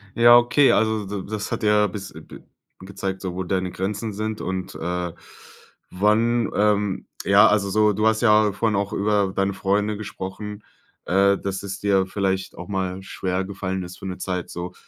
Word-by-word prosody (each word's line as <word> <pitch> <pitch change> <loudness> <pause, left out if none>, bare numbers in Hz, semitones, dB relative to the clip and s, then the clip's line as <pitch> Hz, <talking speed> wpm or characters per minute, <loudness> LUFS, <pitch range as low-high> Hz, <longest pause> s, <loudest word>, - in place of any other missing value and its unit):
Ja, 120 +1 +8
okay, 120 +4 +4
also 110 -1 +1
d 100 -1 -5
d - - -12
das 105 -1 -4
hat - - -3
ja 105 0 +4
bis 100 0 -7
bi - - -10
bi - - -13 0.4
gezeigt, 95 0 -5
so 95 -2 -4
wo 95 - -2
deine 95 0 -2
Grenzen 105 +4 -3
sind 110 +1 -4
und, 95 0 -4
äh, 90 0 -3 0.8
wann 110 +4 +2
ähm, 105 -2 +1 0.2
ja, 100 +1 +6
also, 105 -1 +2
so 105 +1 +3
du 110 +2 +1
hast 110 0 +2
ja 105 -2 +4
vorhin 105 +1 0
auch 100 0 -2
über 100 -1 +1
deine 100 0 +1
Freunde 105 +2 0
gesprochen, 105 0 -7 0.4
äh, 100 +2 +3
dass 95 -1 -4
es 100 0 -5
dir 100 -2 +2
vielleicht 95 -1 -2
auch 90 - -8
mal 95 -2 -3
schwergefallen 95 0 -3
ist 90 0 -10
für - - -9
'ne 90 -1 -5
Zeit 90 -3 -4
so, 90 +1 -6
100 Hz, 185 wpm, -23 LUFS, 95-105 Hz, 0.8 s, Ja